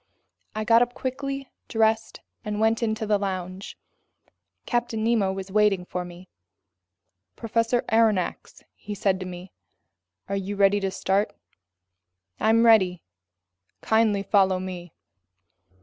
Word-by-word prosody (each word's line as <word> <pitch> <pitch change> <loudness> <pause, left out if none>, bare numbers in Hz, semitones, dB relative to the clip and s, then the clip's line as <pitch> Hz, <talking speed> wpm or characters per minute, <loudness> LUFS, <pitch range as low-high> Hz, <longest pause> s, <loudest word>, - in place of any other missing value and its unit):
I 215 - -2
got 230 +2 +5
up 245 0 0
quickly, 275 +1 -4 0.2
dressed, 225 0 0 0.2
and 210 -2 -3
went 220 +1 +2
into 220 -1 -1
the 210 -1 +2
lounge. 185 -1 -5 0.9
Captain 235 -2 -1
Nemo 220 -4 +2
was 190 0 -6
waiting 205 -3 +2
for 180 0 -4
me. 175 +1 -12 1.1
"Professor 230 +1 0
Aronnax," 220 -5 0
he 205 0 -8
said 195 -2 0
to 185 - -5
me, 180 +1 -9 0.8
"are 200 - -2
you 195 +1 -3
ready 200 0 +4
to 195 -1 -1
start?" 195 +2 -1 1.0
"I'm 225 +1 +4
ready." 185 -7 +4 0.8
"Kindly 220 -3 +2
follow 190 -2 +3
me." 180 -2 -7
205 Hz, 120 wpm, -25 LUFS, 190-225 Hz, 1.1 s, got